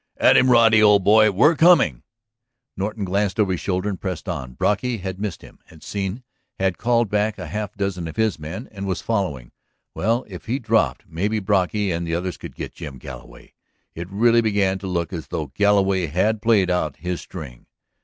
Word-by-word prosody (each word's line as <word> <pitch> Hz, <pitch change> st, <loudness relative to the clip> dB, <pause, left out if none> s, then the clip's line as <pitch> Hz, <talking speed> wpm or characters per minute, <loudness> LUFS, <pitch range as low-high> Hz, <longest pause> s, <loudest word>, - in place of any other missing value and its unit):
"At -, -, +5 dB
him, 130 Hz, -, +5 dB
Roddy, 115 Hz, -3 st, +6 dB
old 105 Hz, -2 st, +5 dB
boy! 110 Hz, +2 st, +6 dB
We're 125 Hz, -, +4 dB
coming!" 150 Hz, -, +4 dB, 0.7 s
Norton 105 Hz, +2 st, -3 dB
glanced 100 Hz, +1 st, -1 dB
over 100 Hz, -3 st, +2 dB
his 90 Hz, -, -2 dB
shoulder 95 Hz, +1 st, -1 dB
and 100 Hz, -3 st, -4 dB
pressed 90 Hz, -4 st, -5 dB
on. 65 Hz, 0 st, -5 dB
Brocky 115 Hz, -, 0 dB
had 95 Hz, -1 st, -6 dB
missed 105 Hz, -4 st, -4 dB
him, -, -, -15 dB
had 80 Hz, -, -17 dB
seen, 100 Hz, +4 st, -4 dB, 0.3 s
had 95 Hz, -2 st, -1 dB
called 120 Hz, -1 st, +2 dB
back 105 Hz, +1 st, 0 dB
a -, -, -6 dB
half 105 Hz, -2 st, -5 dB
dozen 100 Hz, -4 st, -3 dB
of 80 Hz, -, -8 dB
his 110 Hz, -5 st, 0 dB
men 85 Hz, +10 st, -7 dB
and 100 Hz, -1 st, -6 dB
was 95 Hz, -, -3 dB
following. 90 Hz, -, -2 dB, 0.4 s
Well, 115 Hz, +5 st, 0 dB
if 95 Hz, -4 st, -10 dB
he 125 Hz, +4 st, 0 dB
dropped, 115 Hz, -4 st, +1 dB
maybe 100 Hz, +7 st, -1 dB
Brocky 100 Hz, 0 st, 0 dB
and 85 Hz, 0 st, -3 dB
the 85 Hz, -, -1 dB
others 90 Hz, +1 st, -3 dB
could -, -, -10 dB
get -, -, -6 dB
Jim 75 Hz, -6 st, -8 dB
Galloway. -, -, -12 dB, 0.4 s
It 85 Hz, +2 st, -7 dB
really 115 Hz, +4 st, +3 dB
began 100 Hz, -3 st, +1 dB
to 95 Hz, -, -6 dB
look 85 Hz, -1 st, -2 dB
as 80 Hz, -3 st, -6 dB
though 75 Hz, -4 st, -4 dB
Galloway 100 Hz, -2 st, +2 dB
had 105 Hz, +8 st, 0 dB
played 100 Hz, -5 st, +3 dB
out 80 Hz, -5 st, -1 dB
his 90 Hz, +4 st, -4 dB
string. 70 Hz, -9 st, -10 dB
100 Hz, 195 wpm, -22 LUFS, 90-110 Hz, 0.7 s, Roddy